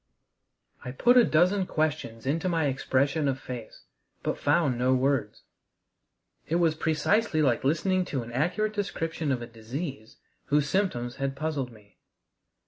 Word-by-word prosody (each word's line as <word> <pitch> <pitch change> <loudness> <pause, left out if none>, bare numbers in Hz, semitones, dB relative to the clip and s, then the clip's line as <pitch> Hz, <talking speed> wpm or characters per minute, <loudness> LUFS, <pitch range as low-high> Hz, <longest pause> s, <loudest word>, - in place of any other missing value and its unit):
I 125 - -5
put 240 - +4
a 245 - +8
dozen 180 +2 +3
questions 150 -8 -2
into 160 +7 0
my 165 -3 +1
expression 140 +2 +1
of 135 -1 -1
face, 125 -4 -8 0.4
but - - -2
found 145 -3 +2
no 130 +1 +3
words. 130 -4 0 1.0
It 165 - 0
was 170 -2 +3
precisely 160 +3 +1
like 125 -5 +2
listening 185 +6 +2
to 135 -8 -3
an 115 - -9
accurate 180 - 0
description 165 -7 -2
of 125 -2 -1
a - - -4
disease 120 +2 -7 0.3
whose 145 0 +2
symptoms 135 -10 -1
had 135 0 -2
puzzled 145 -4 -2
me. 105 -3 -19
145 Hz, 145 wpm, -27 LUFS, 130-165 Hz, 1.0 s, a